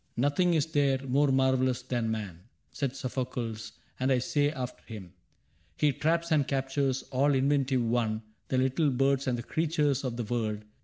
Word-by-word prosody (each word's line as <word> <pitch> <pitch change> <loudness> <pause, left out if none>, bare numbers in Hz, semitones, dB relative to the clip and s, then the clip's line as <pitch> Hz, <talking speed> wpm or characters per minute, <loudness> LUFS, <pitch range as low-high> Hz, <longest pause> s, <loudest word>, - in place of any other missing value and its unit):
( - - -41
' - - -40
Nothing 175 +4 +2
is 150 -3 +2
there 145 -4 +2
more 140 +2 +3
marvelous 130 -1 +2
than 120 -3 -1
man/ 105 -6 -4 0.3
Said 135 -2 -3
Sophocles; 120 -4 -4 0.3
and 130 +1 +1
I 130 - +4
say 145 +3 +1
after 130 -4 -6
him: 100 -6 -9 0.3
' - - -39
He 150 -1 +3
traps 165 +4 0
and 145 -3 +3
captures, 135 -1 0
all 140 +2 +3
inventive 135 -2 +2
one, 115 -1 0 0.2
The 130 - 0
light 130 +1 +1
birds 135 0 +2
and 125 -2 +1
the 120 - -5
creatures 150 -3 0
of 125 -3 -3
the 120 - -2
wold. 110 -2 -2
130 Hz, 185 wpm, -29 LUFS, 120-145 Hz, 0.3 s, I